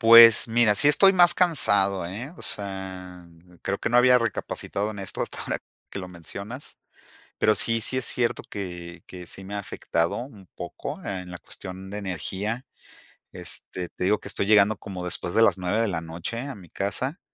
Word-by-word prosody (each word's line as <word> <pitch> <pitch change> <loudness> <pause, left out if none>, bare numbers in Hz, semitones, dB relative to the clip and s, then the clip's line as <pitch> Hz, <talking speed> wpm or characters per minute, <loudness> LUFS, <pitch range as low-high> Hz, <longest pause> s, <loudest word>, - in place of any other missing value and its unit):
Pues 115 -1 +9
mira, 115 -2 +3
sí 145 - +5
estoy 195 +6 +6
más 175 -1 +6
cansado, 100 - +3
¿eh? 115 - -7
O - - -11
sea, 95 -3 -4 0.4
creo 100 0 -2
que - - -2
no 120 - +2
había 125 0 +6
recapacitado 110 -3 -3
en 105 - -9
esto 95 -1 -4
hasta - - -5
ahora - - -3 0.3
que - - -6
lo 90 - -6
mencionas. 100 - -8 0.6
Pero 110 - +3
sí, 115 +1 +4
sí 130 +3 +2
es 130 - 0
cierto 120 -1 0
que 85 -3 -7
que 90 -1 -10
sí 95 - -8
me 100 +2 -7
ha - - -2
afectado 85 -4 -2
un 110 -7 -9
poco - - -7
en 90 -2 -5
la 90 - -7
cuestión 95 +1 -9
de 105 - -5
energía. 100 - -3 0.7
Este, 90 +1 -4
te - - -7
digo 105 +3 +2
que - - -10
estoy - - 0
llegando 105 0 +5
como 95 -3 -7
después 85 0 -3
de 115 - +3
las 115 - +4
9 95 +4 -1
de 115 - +2
la 85 -5 -2
noche 85 +7 -5
a 140 0 -6
mi 90 -5 -14
casa. 130 - -2
100 Hz, 195 wpm, -25 LUFS, 90-115 Hz, 0.7 s, Pues